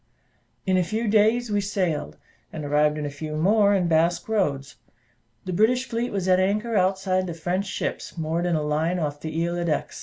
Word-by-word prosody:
In 190 Hz, -2 st, +2 dB
a 180 Hz, -, +3 dB
few 220 Hz, +6 st, -2 dB
days 220 Hz, +2 st, +3 dB
we 205 Hz, 0 st, +1 dB
sailed, 175 Hz, -, -2 dB, 0.3 s
and 155 Hz, -2 st, -6 dB
arrived 150 Hz, +1 st, +2 dB
in 150 Hz, -, -3 dB
a -, -, -2 dB
few 150 Hz, +1 st, -6 dB
more 200 Hz, +5 st, +3 dB
in 180 Hz, -3 st, +1 dB
Basque 170 Hz, +1 st, +2 dB
Roads. 145 Hz, -11 st, -1 dB, 0.7 s
The 185 Hz, -, -3 dB
British 245 Hz, +7 st, +2 dB
fleet 235 Hz, 0 st, -2 dB
was 195 Hz, -2 st, -2 dB
at 185 Hz, 0 st, +4 dB
anchor 210 Hz, +4 st, 0 dB
outside 185 Hz, -1 st, +1 dB
the 170 Hz, -, -5 dB
French 180 Hz, +4 st, -2 dB
ships 190 Hz, -, -4 dB
moored 165 Hz, +2 st, -1 dB
in 175 Hz, -, +1 dB
a 155 Hz, -, 0 dB
line 155 Hz, +4 st, 0 dB
off 145 Hz, -3 st, -3 dB
the 160 Hz, +2 st, -2 dB
Isle 175 Hz, 0 st, -2 dB
d'Aix. 150 Hz, -3 st, -2 dB
180 Hz, 200 wpm, -24 LUFS, 155-205 Hz, 0.7 s, at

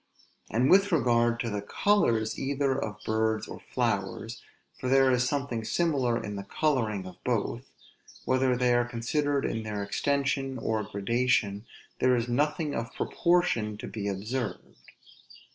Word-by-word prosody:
And 120 Hz, +4 st, +2 dB
with 195 Hz, +2 st, +5 dB
regard 120 Hz, -6 st, +3 dB
to 115 Hz, -, -2 dB
the 105 Hz, -1 st, -2 dB
colors 115 Hz, -, +1 dB
either 140 Hz, 0 st, 0 dB
of 105 Hz, -6 st, -3 dB
birds 110 Hz, 0 st, 0 dB
or -, -, -8 dB
flowers, 115 Hz, -1 st, -2 dB, 0.4 s
for 130 Hz, -, -2 dB
there 135 Hz, 0 st, +5 dB
is 125 Hz, 0 st, +2 dB
something 140 Hz, -6 st, -2 dB
similar 130 Hz, -5 st, +1 dB
in 105 Hz, -2 st, -5 dB
the 100 Hz, -, -5 dB
coloring 110 Hz, -7 st, 0 dB
of 90 Hz, -1 st, -11 dB
both, -, -, -2 dB, 0.6 s
whether 130 Hz, -1 st, +2 dB
they 125 Hz, 0 st, +3 dB
are 120 Hz, 0 st, +3 dB
considered 140 Hz, +4 st, -1 dB
in 115 Hz, -, -2 dB
their 105 Hz, -2 st, -4 dB
extension 135 Hz, +4 st, -1 dB
or 110 Hz, -2 st, -1 dB
gradation, 110 Hz, 0 st, 0 dB, 0.3 s
there 130 Hz, 0 st, +4 dB
is 120 Hz, 0 st, -1 dB
nothing 145 Hz, +4 st, 0 dB
of 115 Hz, +1 st, -3 dB
proportion 170 Hz, -12 st, +1 dB
to -, -, -7 dB
be 105 Hz, -2 st, -4 dB
observed. 105 Hz, +4 st, -4 dB
120 Hz, 145 wpm, -28 LUFS, 110-135 Hz, 0.6 s, with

